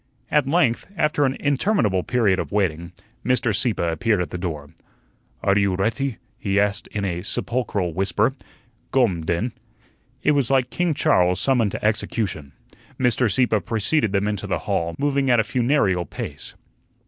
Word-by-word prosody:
At 150 Hz, -3 st, +3 dB
length, 135 Hz, -6 st, +2 dB
after 150 Hz, -1 st, +2 dB
an 135 Hz, 0 st, -1 dB
interminable 140 Hz, -, +1 dB
period 105 Hz, -4 st, +1 dB
of -, -, -4 dB
waiting, 85 Hz, -5 st, -1 dB, 0.3 s
Mr. 120 Hz, -2 st, +1 dB
Sieppe 105 Hz, -2 st, 0 dB
appeared 100 Hz, +5 st, +1 dB
at 90 Hz, -4 st, -3 dB
the -, -, -4 dB
door. 75 Hz, -5 st, -5 dB, 0.7 s
"Are 95 Hz, 0 st, +3 dB
you 100 Hz, -2 st, +2 dB
reatty?" 110 Hz, +5 st, -1 dB, 0.2 s
he 100 Hz, -1 st, +1 dB
asked 100 Hz, 0 st, 0 dB
in 100 Hz, -1 st, -3 dB
a 90 Hz, -2 st, -2 dB
sepulchral 105 Hz, -4 st, -2 dB
whisper. 100 Hz, +7 st, +1 dB, 0.6 s
"Gome, 105 Hz, -11 st, +2 dB
den." 85 Hz, +10 st, -1 dB, 0.7 s
It -, -, +4 dB
was 140 Hz, -5 st, +1 dB
like 130 Hz, -2 st, +2 dB
King 175 Hz, -3 st, 0 dB
Charles 90 Hz, -, +3 dB
summoned 125 Hz, -6 st, +2 dB
to -, -, -4 dB
execution. 105 Hz, -, -1 dB, 0.5 s
Mr. 125 Hz, -2 st, +2 dB
Sieppe 115 Hz, -1 st, +2 dB
preceded 110 Hz, -, 0 dB
them 100 Hz, +1 st, +1 dB
into 105 Hz, -3 st, -3 dB
the -, -, 0 dB
hall, 85 Hz, 0 st, -1 dB
moving 140 Hz, -1 st, +1 dB
at 120 Hz, -2 st, +5 dB
a -, -, +4 dB
funereal 115 Hz, -, +1 dB
pace. -, -, -6 dB
105 Hz, 160 wpm, -22 LUFS, 95-130 Hz, 0.7 s, at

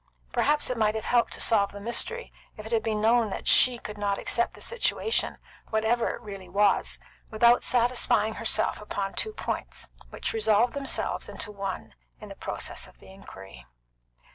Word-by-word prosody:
Perhaps 295 Hz, -2 st, +2 dB
it 245 Hz, -, -3 dB
might 215 Hz, 0 st, +2 dB
have 220 Hz, -, -3 dB
helped 240 Hz, -1 st, +1 dB
solve 200 Hz, -3 st, +3 dB
the 200 Hz, -, -9 dB
mystery 240 Hz, -, -1 dB, 0.2 s
if 215 Hz, -, -9 dB
it 220 Hz, -, -8 dB
had 225 Hz, -1 st, +2 dB
been 215 Hz, -1 st, -1 dB
known 225 Hz, 0 st, +3 dB
that -, -, -5 dB
she 250 Hz, -1 st, +6 dB
could 210 Hz, -2 st, -8 dB
not 200 Hz, -1 st, 0 dB
accept 235 Hz, -, 0 dB
the -, -, -13 dB
situation, 465 Hz, -1 st, 0 dB, 0.3 s
whatever 220 Hz, +2 st, +1 dB
it -, -, -5 dB
really 195 Hz, -5 st, -9 dB
was, 200 Hz, +1 st, +2 dB, 0.3 s
without 235 Hz, +2 st, +4 dB
satisfying 240 Hz, -3 st, +2 dB
herself 225 Hz, -1 st, 0 dB
upon 200 Hz, -2 st, -4 dB
two 435 Hz, -, -2 dB
points, -, -, -4 dB, 0.2 s
which -, -, -4 dB
resolved 240 Hz, -, +3 dB
themselves 280 Hz, -1 st, -1 dB
into 210 Hz, -, -6 dB
one 195 Hz, -, -5 dB, 0.3 s
in -, -, -10 dB
the -, -, -9 dB
process -, -, -3 dB
of -, -, -19 dB
the 190 Hz, -, -15 dB
inquiry. 95 Hz, -, -13 dB
220 Hz, 170 wpm, -27 LUFS, 205-240 Hz, 0.3 s, she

